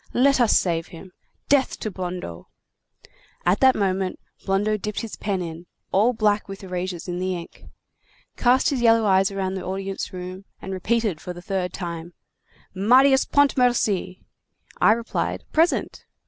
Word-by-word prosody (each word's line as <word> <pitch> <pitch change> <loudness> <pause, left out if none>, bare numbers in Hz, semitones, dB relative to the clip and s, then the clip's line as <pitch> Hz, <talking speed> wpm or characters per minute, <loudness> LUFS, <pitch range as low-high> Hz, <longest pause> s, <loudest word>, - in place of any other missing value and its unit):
Let 270 +1 +4
us 235 - +5
save 165 -2 -1
him. 180 +2 -12 0.4
Death 275 -2 +2
to 215 - -3
Blondeau!' 180 - -6 1.0
At 180 +3 +3
that 260 -1 +5
moment, 190 -2 -1 0.3
Blondeau 205 +2 +1
dipped 210 0 -4
his 230 -2 -6
pen 195 -3 -2
in, 170 +1 -8 0.2
all 215 +6 +4
black 215 -3 +1
with 195 0 -9
erasures 180 -1 -4
in 175 0 -3
the 185 0 -1
ink, 170 -1 -10 0.7
cast 255 +3 +3
his 265 -4 -1
yellow 230 -1 +4
eyes 195 0 +3
round 190 -1 -2
the 190 - -5
audience 195 +1 -4
room, 185 +1 -7
and 190 - -6
repeated 210 -2 -1
for 180 - -6
the 175 - -10
third 185 -2 -2
time: 170 -2 -6 0.6
'Marius 260 +7 +5
Pontmercy!' 245 -9 +1 0.6
I 215 - +6
replied: 230 +1 -3
'Present! 330 +3 +1
195 Hz, 150 wpm, -23 LUFS, 180-230 Hz, 1.0 s, I